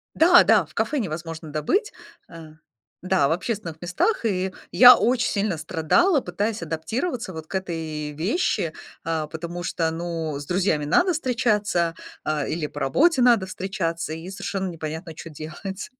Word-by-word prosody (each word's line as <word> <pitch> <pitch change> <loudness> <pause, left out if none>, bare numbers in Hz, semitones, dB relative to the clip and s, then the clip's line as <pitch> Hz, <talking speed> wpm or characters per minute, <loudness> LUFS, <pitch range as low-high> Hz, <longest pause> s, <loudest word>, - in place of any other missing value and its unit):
Да, 350 +2 +7
да, - - +4
в - - -21
кафе 300 - 0
невозможно 165 - -5
добыть, 155 - 0 0.4
э, 165 -2 -11 0.5
да, 185 -6 +2
в 145 - -1
общественных 180 -3 -3
местах. 180 - 0
И 190 -3 -1 0.2
я 250 0 +10
очень 245 0 +1
сильно 200 -4 -1
страдала, 265 - +2
пытаясь 205 +3 -2
адаптироваться 220 - -3
вот 160 -1 -8
к - - -7
этой 160 -5 -4
вещи, 165 - -1 0.3
а, 160 -2 -2
потому 170 +3 -6
что, 165 -2 -1
ну, 165 -3 -4
с 145 - -8
друзьями 175 -4 0
надо 350 - +3
встречаться, 210 - 0 0.3
а, 150 -2 -1
или 155 -2 -2
по - - -8
работе 265 - +3
надо 235 -6 +5
встречаться, 180 -4 -3
и 165 +3 -7
совершенно 195 0 -4
непонятно, 160 0 -6
чё 165 - -9
делать. 165 +6 -7
175 Hz, 155 wpm, -24 LUFS, 160-215 Hz, 0.5 s, я